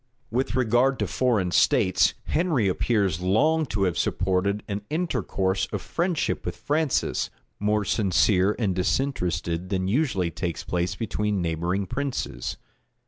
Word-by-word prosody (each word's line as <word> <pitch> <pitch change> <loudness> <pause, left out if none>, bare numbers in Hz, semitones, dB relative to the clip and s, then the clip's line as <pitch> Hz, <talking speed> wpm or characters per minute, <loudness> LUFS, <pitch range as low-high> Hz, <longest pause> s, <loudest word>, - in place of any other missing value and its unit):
With 125 +3 0
regard 130 +2 +3
to - - 0
foreign 110 -9 +1
states, 95 +1 +3
Henry 155 - +1
appears 95 -3 +1
long 155 - +2
to 100 -3 -1
have 90 -3 0
supported 95 +2 0
an 100 0 -3
intercourse 95 - -1
of - - -2
friendship 170 -1 -1
with - - -4
Francis, 150 -1 0 0.3
more 105 0 +1
sincere 95 0 +2
and 105 -6 0
disinterested 90 - -1
than 95 -1 -1
usually 100 - +1
takes 85 0 -4
place 90 0 -1
between 105 -1 -1
neighboring 85 +3 -1
princes. 135 +4 -3
100 Hz, 130 wpm, -25 LUFS, 90-130 Hz, 0.3 s, regard